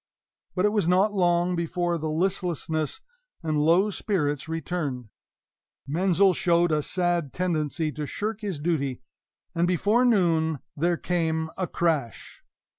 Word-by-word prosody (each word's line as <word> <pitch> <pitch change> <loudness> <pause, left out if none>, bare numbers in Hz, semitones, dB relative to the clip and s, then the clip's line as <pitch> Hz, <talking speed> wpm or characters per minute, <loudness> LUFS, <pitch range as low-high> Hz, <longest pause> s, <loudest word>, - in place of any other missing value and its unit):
But 185 +1 +2
it - - +5
was 210 -6 +1
not 190 +4 +3
long 175 -1 +2
before 175 0 -1
the 155 0 -3
listlessness 165 -3 -1 0.4
and 155 -2 0
low 180 +7 +4
spirits 150 -8 -1
returned; 150 -7 -3 0.8
Menzel 185 +6 +3
showed 170 0 +2
a 155 -1 +2
sad 175 -3 -1
tendency 160 -3 -1
to 150 -1 -5
shirk 215 +5 -3
his 195 -8 -3
duty; 145 -5 -1 0.5
and 170 +1 +1
before 205 +7 +2
noon 165 -9 +2 0.2
there 170 +3 +1
came 160 -2 -1
a 185 -2 -2
crash. 155 -10 -2
170 Hz, 130 wpm, -26 LUFS, 155-180 Hz, 0.8 s, it